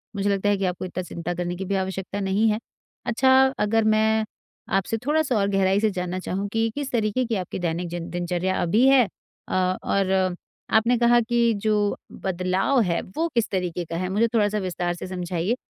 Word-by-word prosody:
मुझे 200 Hz, 0 st, 0 dB
लगता 200 Hz, 0 st, +1 dB
है 205 Hz, -, +2 dB
कि 195 Hz, -, -1 dB
आपको 180 Hz, 0 st, -2 dB
इतना 185 Hz, 0 st, -4 dB
चिंता 175 Hz, 0 st, -5 dB
करने 175 Hz, 0 st, -3 dB
की 190 Hz, +2 st, -5 dB
भी 200 Hz, -, -1 dB
आवश्यकता 190 Hz, +1 st, -3 dB
नहीं 200 Hz, +3 st, +1 dB
है। 215 Hz, +1 st, 0 dB, 0.5 s
अच्छा 260 Hz, +3 st, +3 dB, 0.3 s
अगर 225 Hz, +2 st, +2 dB
मैं 220 Hz, 0 st, +3 dB, 0.5 s
आपसे 195 Hz, +4 st, -1 dB
थोड़ा-सा 300 Hz, -3 st, +1 dB
और 200 Hz, -, +2 dB
गहराई 195 Hz, 0 st, +2 dB
से 220 Hz, 0 st, +2 dB
जानना 180 Hz, -1 st, -3 dB
चाहूँ 190 Hz, +2 st, -3 dB
कि 225 Hz, 0 st, +1 dB
किस 285 Hz, -2 st, -4 dB
तरीक़े 230 Hz, +1 st, 0 dB
की 230 Hz, -1 st, -1 dB
आपकी 185 Hz, -1 st, -4 dB
दैनिक 175 Hz, 0 st, -2 dB
जिन 170 Hz, 0 st, -5 dB
दिनचर्या 175 Hz, +1 st, -1 dB
अभी 215 Hz, +10 st, +3 dB
है 265 Hz, -4 st, +6 dB, 0.4 s
अ 185 Hz, 0 st, +1 dB
और 195 Hz, -1 st, +1 dB, 0.6 s
आपने 235 Hz, +3 st, +4 dB
कहा 240 Hz, 0 st, +5 dB
कि 235 Hz, 0 st, +2 dB
जो 215 Hz, -1 st, +2 dB, 0.5 s
बदलाव 190 Hz, +7 st, +1 dB
है, 175 Hz, -4 st, 0 dB
वो 320 Hz, -, -3 dB
किस 235 Hz, -2 st, +1 dB
तरीक़े 180 Hz, -2 st, -2 dB
का 165 Hz, +1 st, -6 dB
है 185 Hz, +1 st, -2 dB
मुझे 215 Hz, +4 st, +2 dB
थोड़ा-सा 210 Hz, -2 st, +2 dB
विस्तार 175 Hz, -2 st, -2 dB
से 175 Hz, -, -7 dB
समझाइए, 180 Hz, +3 st, -2 dB
195 Hz, 195 wpm, -24 LUFS, 180-225 Hz, 0.6 s, है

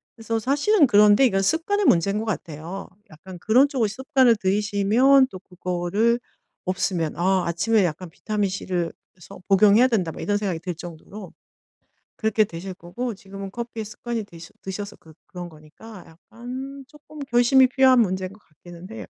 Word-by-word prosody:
그래서 225 Hz, 0 st, -3 dB
사실은 290 Hz, -, +3 dB
그런데 210 Hz, +2 st, +5 dB
이건 195 Hz, -6 st, +2 dB
습관의 340 Hz, -, 0 dB
문제인 200 Hz, -, +3 dB
것 220 Hz, -, -4 dB
같아요. 170 Hz, -2 st, -6 dB, 0.2 s
약간 175 Hz, +3 st, -12 dB
그런 250 Hz, +9 st, +4 dB
쪽을 250 Hz, -6 st, 0 dB
습관을 260 Hz, +2 st, +2 dB
들이시면 210 Hz, +7 st, +3 dB
또 185 Hz, -, -8 dB
그거를 185 Hz, +6 st, -1 dB, 0.5 s
없으면 180 Hz, -3 st, -1 dB
'아 185 Hz, +3 st, +1 dB
아침에 195 Hz, +5 st, +2 dB
약간 170 Hz, +2 st, -4 dB
비타민 205 Hz, +3 st, -2 dB
C를 180 Hz, -3 st, -3 dB, 0.2 s
그래서 180 Hz, -1 st, -14 dB
복용해야 205 Hz, +5 st, +5 dB
된다.' 195 Hz, -9 st, 0 dB
뭐 -, -, -9 dB
이런 205 Hz, -, 0 dB
생각이 195 Hz, -5 st, -3 dB
들 180 Hz, 0 st, -5 dB
정도로 175 Hz, +4 st, -10 dB, 0.8 s
그렇게 220 Hz, -1 st, +1 dB
되실 185 Hz, +1 st, -8 dB
거고 225 Hz, +8 st, -5 dB
지금은 195 Hz, 0 st, -9 dB
커피에 235 Hz, -1 st, -6 dB
습관이 225 Hz, +2 st, -5 dB
드셔 170 Hz, -4 st, -13 dB
드셔서 200 Hz, +2 st, -6 dB
그 160 Hz, -, -18 dB
그런 175 Hz, -1 st, -8 dB
거니까 170 Hz, +6 st, -14 dB
약간 255 Hz, +10 st, -9 dB
쪼끔 300 Hz, +1 st, -15 dB
결심이 245 Hz, +2 st, +5 dB
필요한 260 Hz, -1 st, +4 dB
문제인 185 Hz, -2 st, -2 dB
것 210 Hz, -, -18 dB
같기는 175 Hz, 0 st, -14 dB
해요. 225 Hz, -, -8 dB
205 Hz, 365 characters per minute, -23 LUFS, 180-235 Hz, 0.8 s, 그런데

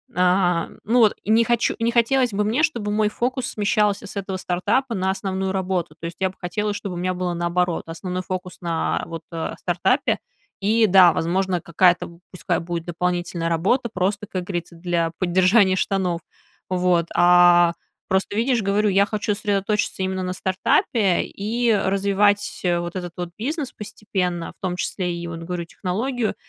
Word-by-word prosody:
а, 180 Hz, -1 st, +2 dB
ну, 240 Hz, +3 st, +2 dB
вот, 215 Hz, -3 st, +5 dB
не 220 Hz, +2 st, +4 dB
хочу, 240 Hz, 0 st, +1 dB
не 230 Hz, +1 st, +1 dB
хотелось 240 Hz, +1 st, +2 dB
бы 205 Hz, +1 st, 0 dB
мне, 225 Hz, +8 st, +1 dB
чтобы 235 Hz, -10 st, 0 dB
мой 210 Hz, 0 st, +2 dB
фокус 255 Hz, +3 st, -2 dB
смещался 205 Hz, -1 st, +1 dB
с 200 Hz, -, -10 dB
этого 195 Hz, -1 st, -3 dB
стартапа 205 Hz, +9 st, 0 dB
на 190 Hz, -1 st, -1 dB
основную 190 Hz, 0 st, -2 dB
работу. 185 Hz, -2 st, -2 dB
То -, -, -7 dB
есть, 170 Hz, -, -6 dB
я 190 Hz, -, +1 dB
бы 185 Hz, -, -14 dB
хотела, 210 Hz, +4 st, -2 dB
чтобы 195 Hz, -3 st, -5 dB
у -, -, -5 dB
меня 185 Hz, +1 st, -1 dB
было 180 Hz, -1 st, -2 dB
наоборот: 175 Hz, 0 st, 0 dB
основной 180 Hz, +2 st, -4 dB
фокус 185 Hz, 0 st, -5 dB
на, 165 Hz, -2 st, -1 dB
вот, 165 Hz, -1 st, -7 dB
а, 165 Hz, -1 st, -4 dB
стартапе -, -, +1 dB, 0.4 s
и 220 Hz, +3 st, +3 dB
да, 180 Hz, -2 st, +7 dB
возможно, 180 Hz, +2 st, 0 dB
какая-то 170 Hz, 0 st, +2 dB
пускай 180 Hz, -, -1 dB
будет 170 Hz, 0 st, -4 dB
дополнительная 175 Hz, -1 st, -2 dB
работа 205 Hz, +10 st, +1 dB
просто, 200 Hz, +3 st, -1 dB
как 185 Hz, -3 st, -3 dB
говорится, 175 Hz, -2 st, -5 dB
для 170 Hz, -1 st, -1 dB
поддержания 185 Hz, +2 st, +4 dB
штанов, 185 Hz, -3 st, -1 dB, 0.5 s
вот, 180 Hz, -2 st, +2 dB
а, 175 Hz, -1 st, +6 dB, 0.3 s
просто, 190 Hz, +2 st, 0 dB
видишь, 235 Hz, +1 st, +1 dB
говорю, 205 Hz, +2 st, +1 dB
я 200 Hz, +1 st, +4 dB
хочу 210 Hz, -1 st, -1 dB
сосредоточиться 205 Hz, -1 st, -1 dB
именно 190 Hz, 0 st, -2 dB
на 185 Hz, 0 st, -2 dB
стартапе 190 Hz, +1 st, +1 dB
и 230 Hz, +3 st, 0 dB
развивать 200 Hz, +1 st, +1 dB
вот 175 Hz, 0 st, -1 dB
этот 175 Hz, -2 st, -4 dB
вот 175 Hz, -1 st, -4 dB
бизнес 280 Hz, +3 st, -3 dB
постепенно, 190 Hz, -5 st, -3 dB
в -, -, -60 dB
том 185 Hz, -2 st, -2 dB
числе 180 Hz, 0 st, -2 dB
и, 170 Hz, 0 st, -5 dB
вот 165 Hz, -1 st, -6 dB
говорю, 170 Hz, +1 st, -4 dB
технологию, 220 Hz, +7 st, -2 dB
190 Hz, 170 wpm, -22 LUFS, 175-210 Hz, 0.5 s, да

